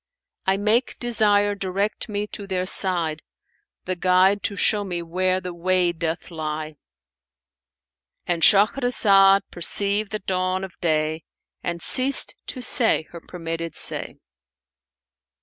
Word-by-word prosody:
I 190 0 +2
make 215 +5 0
desire 205 -4 +1
direct 200 +3 -3
me 205 0 -2
to 200 - -8
their 185 -1 -2
side, 170 -5 +3 0.3
* - - -48
The 185 - -2
guide 185 +3 +2
to 205 - -1
show 205 +2 +1
me 175 -3 -4
where 185 +2 -1
the 180 -1 -7
way 180 0 +1
doth 165 +1 -5
lie." 155 -1 -5 1.5
And 175 -1 -2
Shahrazad 200 -2 +4
perceived 200 +4 0
the 215 - -1
dawn 185 -1 -2
of 190 -1 -8
day 155 -1 -1 0.4
and 170 -1 -5
ceased 265 +2 +3
to 255 - -5
say 230 -9 +2
her 170 - -10
permitted 165 -2 -6
say. - - -2
185 Hz, 130 wpm, -22 LUFS, 170-205 Hz, 1.5 s, Shahrazad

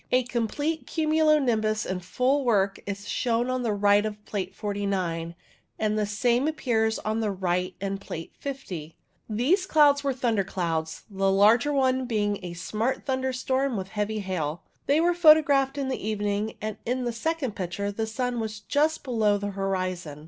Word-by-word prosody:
A 255 0 +4
complete 255 +7 -2
cumulo 310 -1 +3
nimbus 220 -5 +1
in 185 -1 -2
full 255 +10 +1
work 200 -5 +2
is 200 0 -5
shown 240 +1 0
on 255 0 -1
the 235 -3 0
right 205 0 +4
of 210 -1 -5
Plate 190 -3 -4
49, 190 -5 -2 0.4
and 215 -1 0
the 210 -1 0
same 240 +6 +1
appears 225 -8 0
on 215 +1 -2
the 220 -2 0
right 185 -1 -1
in 195 0 -3
Plate 165 -4 -7
50, 185 - -6 0.3
These 295 - +1
clouds 290 -4 +5
were 280 - +1
thunder 235 -5 0
clouds, 165 -4 -3
the 195 -1 0
larger 220 +8 +5
one 260 -2 +2
being 205 -3 -1
a 175 -1 -5
smart 220 +8 -2
thunderstorm 260 -1 0
with 190 0 -5
heavy 210 +1 -2
hail. 175 -4 -3 0.2
They 285 +2 +4
were 345 +2 +3
photographed 295 -5 +5
in 275 -1 -1
the 260 - -3
evening, 210 0 -2
and 215 0 -4
in 250 +2 -1
the 240 - -1
second 270 -2 -2
picture 195 +2 -3
the 220 +2 -3
sun 245 +2 -2
was 220 -1 -4
just 300 +8 0
below 220 -5 +2
the 205 0 -4
horizon. 185 -5 -3
220 Hz, 170 wpm, -26 LUFS, 195-260 Hz, 0.4 s, clouds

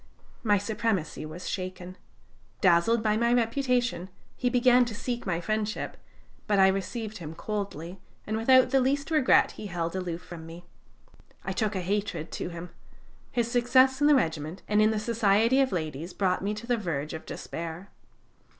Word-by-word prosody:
My 205 -3 +3
supremacy 205 -7 -2
was 165 +4 -8
shaken. 185 -1 -5 0.6
Dazzled 195 +5 +3
by 215 -1 +2
my 235 +1 +2
reputation, 240 -6 0 0.3
he 250 - 0
began 250 0 +5
to 230 -3 -6
seek 240 0 -4
my 170 -2 0
friendship, 215 +4 -2 0.5
but 205 -2 +2
I 190 0 +6
received 210 +3 -3
him 160 -1 -7
coldly, 195 -3 -5 0.3
and 215 - -2
without 255 +3 +5
the 270 - +4
least 280 +4 0
regret 305 -5 +4
he 210 - -8
held 170 -2 -3
aloof 180 -2 -4
from 165 -2 -9
me. 170 +2 -11 0.8
I - - -2
took 215 -2 -1
a 185 - -1
hatred 190 -4 -2
to - - -4
him. 170 0 -8 0.6
His 235 -1 -1
success 255 +3 +4
in 290 - +5
the 300 - +6
regiment 160 - -1
and 210 0 +3
in 215 - +5
the 220 - 0
society 225 +3 +3
of 265 - +1
ladies 160 -1 -4
brought 185 -2 +1
me 205 +2 -2
to 215 +2 -8
the 245 0 +1
verge 155 -7 -3
of 160 - -8
despair. 170 +3 -6
205 Hz, 170 wpm, -28 LUFS, 175-235 Hz, 0.8 s, I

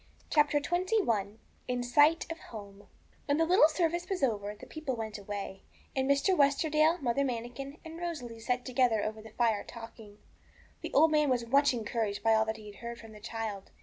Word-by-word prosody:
CHAPTER 295 -1 +4
XXI 305 - 0 0.3
IN 250 -1 -1
SIGHT 290 +7 +4
OF 330 - -6
HOME 200 -2 -11 0.4
When 285 0 +2
the 325 - +3
little 350 -2 +6
service 345 +2 -1
was 375 -6 -2
over, 210 -4 0
the - - -12
people 310 -5 -4
went 220 -2 -5
away, 200 -1 -6 0.3
and 265 0 0
Mr. 280 +7 +3
Westerdale, 310 +2 +3
Mother 245 +3 +1
Manikin, 250 +3 -4
and 325 +1 -8
Rosalie 250 -10 -5
sat 250 +2 -1
together 245 -4 +2
over 215 0 -4
the 220 - -11
fire 220 -2 +1
talking. 225 -3 -11 0.6
The - - -5
old 320 0 +5
man 300 -2 +3
was 245 -2 +1
much 280 +4 +4
encouraged 220 -3 -2
by 225 0 +4
all 220 0 +4
that 220 0 -3
he 210 -1 -10
heard 235 +3 -7
from 225 -1 -12
the 210 - -12
child. 220 -3 -5
245 Hz, 185 wpm, -31 LUFS, 220-300 Hz, 0.6 s, little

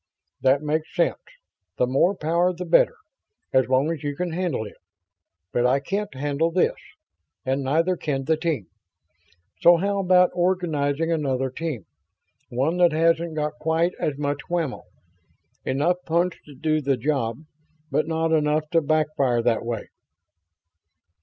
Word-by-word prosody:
"That 135 +2 +3
makes 155 +1 -2
sense. - - +1 0.6
The 125 - +3
more 140 +10 +2
power 170 +2 +1
the 180 +1 -5
better, 175 - +4 0.6
as 130 -2 +4
long 135 +4 +2
as 160 -4 -4
you 145 -1 -2
can 180 +3 -3
handle 165 -9 -2
it. 105 - -11 0.8
But 120 0 +3
I 130 +2 +3
can't 195 +9 -3
handle 145 +4 0
this. 175 +2 +2 0.7
And 135 +1 0
neither 165 +7 +1
can 140 -5 -2
the 160 +2 +3
team. 155 - -2 0.9
So 175 0 +7
how 200 +3 0
about 180 -1 +4
organizing 165 -4 0
another 135 -5 0
team, 150 - -4 0.6
one 135 +8 0
that 175 -3 +4
hasn't 165 0 +2
got 150 0 -2
quite 160 +2 +1
so 150 - 0
much 145 0 -2
whammo? 165 -6 -2 0.8
Enough 150 +7 +1
punch 170 +2 0
to 145 - -12
do 155 +3 0
the 135 -2 +1
job, 130 -1 -1 0.5
but 150 +2 +1
not 160 0 0
enough 155 0 +1
to 165 - +4
backfire 150 -6 +1
that 120 -1 +1
way?" 115 -2 -4
155 Hz, 145 wpm, -24 LUFS, 135-170 Hz, 0.9 s, So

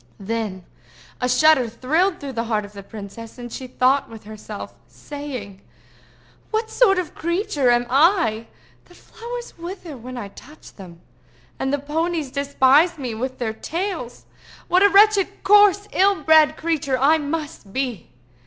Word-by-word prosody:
Then 200 -3 -4 0.6
a 250 - 0
shudder 260 -1 +4
thrilled 320 - 0
through 275 -2 -7
the 230 0 -2
heart 215 -2 -1
of 205 - -14
the 200 - -9
princess, 215 +3 -10
and 240 -1 -8
she 260 - -6
thought 260 +2 +1
with 225 -1 -11
herself, 215 0 -9
saying—"What 285 - -9
sort 390 -6 +4
of 360 -4 -2
a - - -25
creature 340 - -1
am 240 0 +3
I 260 - +2 0.4
that - - -27
the 355 - -17
flowers 480 +4 -9
wither 345 -3 -7
when 250 +1 -9
I 205 -4 -6
touch 300 +9 -15
them, 175 -4 -13 0.6
and 265 - -1
the 285 - +1
ponies 310 0 -2
despise 280 +4 +3
me 255 -5 -4
with 255 +4 -4
their 225 -3 -3
tails? 330 - -5 0.4
What 365 - +3
a 405 - +6
wretched, 405 0 +4
coarse, 410 0 +5
ill 385 -4 +2
bred 310 0 +5
creature 305 -5 -1
I 295 +5 +4
must 295 -8 -5
be! 250 -4 -3
280 Hz, 155 wpm, -22 LUFS, 230-340 Hz, 0.6 s, a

